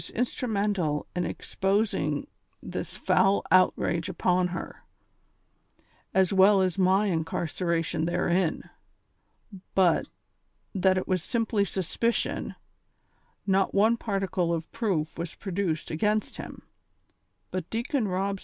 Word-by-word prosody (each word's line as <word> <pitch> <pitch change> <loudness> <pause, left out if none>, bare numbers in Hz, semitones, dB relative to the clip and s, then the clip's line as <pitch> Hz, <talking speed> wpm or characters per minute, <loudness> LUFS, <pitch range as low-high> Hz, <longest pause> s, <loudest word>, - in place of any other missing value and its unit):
193 - - -7
instrumental 205 - 0
in 180 -1 0
exposing 195 -7 -1 0.4
this - - -5
foul 195 +1 +3
outrage 185 -1 +3
upon 180 0 +1
her, 175 -1 -7 1.3
as 190 0 +3
well 195 +1 +6
as 185 -2 +1
my 190 +2 +3
incarceration 165 -1 -1
therein; 175 0 0 1.1
but, 180 -3 +3 0.6
that 190 -1 +3
it 185 - -2
was 185 -2 +1
simply 225 0 0
suspicion, 200 +5 -1 0.9
not 195 -1 +2
one 220 +4 +5
particle 195 -6 -1
of 165 -1 -3
proof 170 -9 -2
was 170 -1 -5
produced 185 -5 -2
against 210 +6 0
him, - - -8 0.9
but 185 -2 -4
Deacon 235 +1 -1
Rob 195 +1 -1
190 Hz, 105 wpm, -27 LUFS, 170-200 Hz, 1.3 s, well